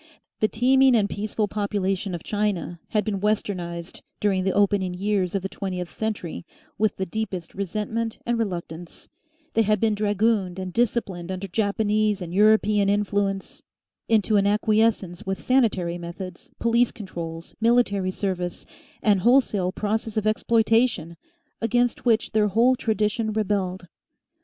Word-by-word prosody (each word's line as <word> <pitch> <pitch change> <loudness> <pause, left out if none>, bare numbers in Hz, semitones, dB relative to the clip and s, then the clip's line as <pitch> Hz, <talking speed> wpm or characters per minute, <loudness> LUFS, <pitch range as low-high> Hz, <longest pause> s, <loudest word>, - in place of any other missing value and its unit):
The 215 - +3
teeming 260 +3 +4
and 210 -3 +3
peaceful 210 +1 -2
population 200 -2 -1
of 170 - -8
China 205 -5 -2
had 210 -2 0
been 205 -3 -1
"westernised" 180 -5 -2 0.2
during 195 -3 +1
the 190 - +1
opening 200 -3 +2
years 195 -1 0
of 195 - -1
the - - -1
twentieth 185 -3 -5
century 200 - -3 0.3
with 215 0 +1
the 190 - -2
deepest 190 -3 -4
resentment 215 +4 -3
and 240 -1 0
reluctance; 175 -5 -5 0.4
they 225 - +3
had 215 -1 +2
been 220 0 +2
dragooned 205 -2 +1
and 185 -1 -5
disciplined 200 -7 -1
under 190 +1 -4
Japanese 210 +1 +1
and 175 -2 -6
European 210 0 +4
influence 200 -1 -1 0.5
into 215 -1 +3
an 200 0 +3
acquiescence 210 -3 +1
with 190 0 -1
sanitary 195 -10 +1
methods, 175 +1 -8
police 235 +1 +2
controls, 170 -6 -7
military 225 -5 +3
service, 185 -2 -3 0.4
and 205 -3 +4
wholesale 210 -5 +3
process 215 +2 -2
of 215 - 0
exploitation 225 -5 +2 0.5
against 240 +2 +1
which 225 -2 +2
their 215 -1 +3
whole 235 +6 +4
tradition 220 -2 0
rebelled. 195 -4 -1
205 Hz, 140 wpm, -24 LUFS, 185-220 Hz, 0.5 s, teeming